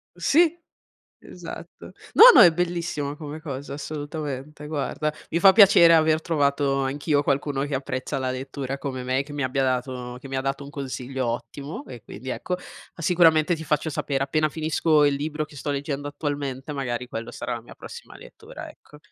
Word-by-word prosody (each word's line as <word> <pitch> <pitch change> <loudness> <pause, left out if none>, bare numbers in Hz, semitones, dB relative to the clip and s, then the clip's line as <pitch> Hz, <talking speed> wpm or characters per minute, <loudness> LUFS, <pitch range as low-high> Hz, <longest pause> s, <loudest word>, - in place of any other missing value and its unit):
Sì, 335 +2 +3 0.6
esatto. - - -10 0.2
No, - - +8
no, - - +9
è 175 - +8
bellissima 170 -4 -2
come 150 0 -8
cosa, 140 -2 -6
assolutamente, 145 0 -6
guarda. 150 0 -2 0.2
Mi 170 - +1
fa 195 +1 +8
piacere 190 -5 +7
aver 155 0 +3
trovato 140 -3 +1
anch'io 145 +2 0
qualcuno 140 0 0
che 145 -1 -3
apprezza 130 -1 -3
la 130 -1 -2
lettura 135 +1 -5
come 130 -2 -5
me, 130 +2 0
che 145 +1 -11
mi 145 -2 -2
abbia 130 +1 0
dato 125 -1 -2
che 135 - -10
mi 135 0 -2
dato 135 +1 -3
un 140 - -10
consiglio 130 -2 -4
ottimo 125 +6 -5
e 120 -4 -10
quindi, 125 +6 -9
ecco, 180 - -4
ah, 180 -1 -9
sicuramente 165 -1 +4
ti 160 - -8
faccio 155 +1 0
sapere, 135 -2 -2
appena 155 +3 0
finisco 155 0 +2
il 145 -1 +2
libro 150 +2 -3
che 150 - -17
sto 145 +1 -4
leggendo 145 0 -3
attualmente. 145 -2 -4
Magari 125 -3 -3
quello 115 -2 -6
sarà 125 - -5
la 120 - -7
mia 120 - -14
prossima - - -11
lettura, - - -11
ecco. 150 - -17
145 Hz, 180 wpm, -24 LUFS, 135-155 Hz, 0.6 s, no